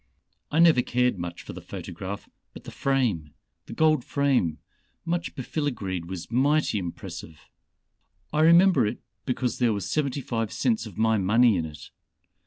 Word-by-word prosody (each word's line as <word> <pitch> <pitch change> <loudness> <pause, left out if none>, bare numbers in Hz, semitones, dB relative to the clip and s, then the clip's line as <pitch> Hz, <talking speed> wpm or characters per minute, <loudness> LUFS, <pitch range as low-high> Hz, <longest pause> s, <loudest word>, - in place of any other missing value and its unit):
I 150 - -2
never 165 -6 +6
cared 125 -4 0
much 85 0 -6
for - - -8
the - - -9
photograph, 95 +4 -7 0.3
but - - -11
the - - -9
frame 115 - -1 0.3
the - - -7
gold 155 -4 +3
frame 135 - +1 0.5
much 175 0 -2
befiligreed 120 - -3
was 90 +2 -7
mighty 140 -2 +2
impressive. 85 -3 -8 0.9
I 150 - +1
remember 170 - +6
it - - -5 0.2
because 125 -1 -1
there 120 -3 +3
was 100 - -3
seventy 145 -3 -1
five 115 -4 -2
cents 225 - 0
of 105 - -12
my 110 0 +2
money 110 +4 +4
in 85 -3 -1
it. 75 -2 -12
120 Hz, 155 wpm, -26 LUFS, 95-145 Hz, 0.9 s, never